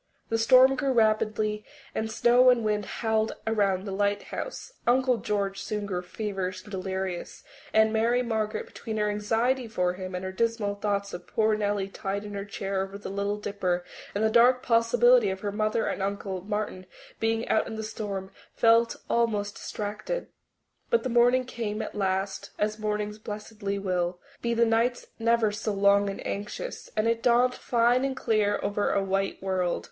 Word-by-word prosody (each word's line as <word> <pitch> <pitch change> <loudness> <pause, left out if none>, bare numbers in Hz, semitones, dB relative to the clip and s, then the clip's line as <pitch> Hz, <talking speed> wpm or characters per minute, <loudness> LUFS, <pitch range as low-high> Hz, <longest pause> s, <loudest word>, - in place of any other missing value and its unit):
The 225 - +1
storm 255 +4 +7
grew 270 -1 0
rapidly 215 -2 +2
worse, - - -29 0.3
and 220 0 -2
snow 245 +3 +5
and 240 -3 +3
wind 210 -2 0
howled 220 -1 0
around 200 -4 +1
the 200 - -4
lighthouse. 205 - -3
Uncle 255 0 +3
George 200 -2 -2
soon 210 0 -3
grew 180 -3 -2
feverish 185 -1 -4
and 205 - -14
delirious, 190 -1 -4 0.3
and 220 0 +4
Mary 235 +3 +2
Margaret, 220 -2 -2
between 220 -1 -6
her 210 0 +1
anxiety 230 +5 0
for 180 -5 0
him 185 0 -6
and 180 +1 -4
her 190 - -3
dismal 225 0 0
thoughts 200 -1 -2
of 175 - -7
poor 220 -1 +2
Nellie 205 -2 0
tied 195 +1 -4
in 205 0 -7
her 200 0 -4
chair 195 -1 -3
over 195 +1 -5
at 200 - -9
the - - -5
Little 200 +1 -1
Dipper, 190 -4 -2 0.3
and 205 - 0
the 220 - +3
dark 245 +2 +5
possibility 240 -1 +4
of 190 0 -4
her 205 - -2
mother 215 +2 0
and - - -2
Uncle 195 -1 -3
Martin 205 -2 -4 0.3
being 225 +1 0
out 220 - +2
in 225 - -5
the 220 - -4
storm, 200 -3 -5 0.2
felt 230 0 +4
almost 210 -3 +1
distracted. 215 - -4 0.6
But 470 - +3
the 260 - -2
morning 245 +2 +4
came 225 -4 -4
at - - -4
last, 195 -1 -1
as 215 +1 -1
mornings 210 0 -2
blessedly 210 -1 -5
will, 180 -2 -1 0.2
be 235 0 0
the 235 0 +4
nights 230 +2 +1
never 230 -1 +3
so 210 0 -2
long 200 0 +4
and 195 - -6
anxious, 210 - -5
and 215 +1 +2
it 230 0 +1
dawned 245 +1 +4
fine 240 +1 +2
and 270 -1 -1
clear 215 -4 +1
over 205 0 0
a 200 - +1
white 195 0 -1
world. 185 -2 0
210 Hz, 180 wpm, -27 LUFS, 200-230 Hz, 0.6 s, storm